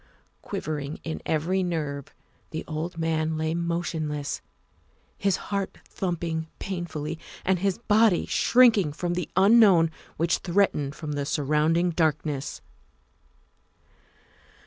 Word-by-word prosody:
Quivering 150 -1 -4
in 160 - -4
every 170 +5 +1
nerve, 150 -6 -2 0.4
the 160 - -5
old 160 +2 -4
man 160 -1 0
lay 160 0 -1
motionless, 165 -4 -2 0.7
his 195 -2 +1
heart 200 -1 -3
thumping 170 -3 -3
painfully 165 -4 -4 0.3
and 185 -1 +2
his 195 0 0
body 220 -4 +3
shrinking 220 -11 +4
from 175 +3 -2
the 175 -2 -3
unknown 195 -4 +6 0.3
which 170 +1 +1
threatened 170 -6 +1
from 155 -3 -5
the 145 -1 -1
surround 150 +3 +1
ing 175 +1 +2
darkness. 155 -4 -1
165 Hz, 110 wpm, -26 LUFS, 155-180 Hz, 0.7 s, unknown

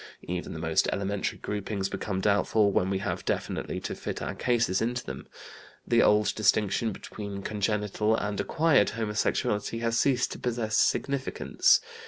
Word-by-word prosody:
Even 90 0 -4
the - - -6
most 80 0 +1
elementary 100 0 -2
groupings 100 -1 -3
become 95 -1 -3
doubtful 100 +1 +3
when 95 -1 +1
we 95 - 0
have 95 - -3
definitely - - -2
to - - -4
fit - - -5
our - - -3
cases 115 -6 +1
into 120 +2 -1
them. - - -7 0.6
The 120 0 +4
old 105 0 +4
distinction 110 +1 +2
between 100 -1 -7
congenital 105 +1 0
and 105 -2 -2
acquired 160 -9 +3
homosexuality 105 0 -1
has 115 0 +1
ceased 130 -3 +2
to - - -6
possess 115 -3 -1
significance. 140 +3 +2
105 Hz, 150 wpm, -28 LUFS, 100-115 Hz, 0.6 s, The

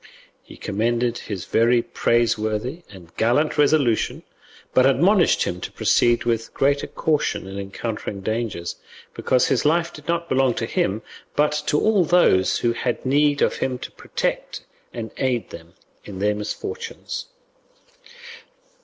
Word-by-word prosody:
He - - -14
commended 120 +3 -1
his 100 -4 -6
very 120 +1 +3
praiseworthy 115 +5 0
and 90 -5 -14
gallant 125 +7 +2
resolution, 140 -6 +2 0.5
but 130 +1 +5
admonished 175 - +4
him 90 0 -4
to - - -5
proceed 120 0 +2
with 115 -1 -2
greater 140 +1 +1
caution 150 -10 -1
in 95 +1 -6
encountering 100 0 -5
dangers, 110 -5 -3 0.4
because 125 - +1
his - - +2
life 170 +3 +1
did 150 - -12
not 170 0 -1
belong 130 -3 +2
to 115 - -2
him, 110 -1 -1 0.3
but 150 0 +3 0.2
to 150 - +2
all 215 -4 +3
those 160 - +3
who 120 -1 +1
had 120 +1 -3
need 145 +2 +3
of - - +1
him 130 -1 -1
to - - -8
protect - - -3 0.3
and 115 -2 -6
aid 125 -3 -1
them 85 +1 -12 0.3
in 100 -2 -9
their 105 +2 +1
misfortunes. 420 - -5
120 Hz, 140 wpm, -22 LUFS, 110-145 Hz, 0.5 s, but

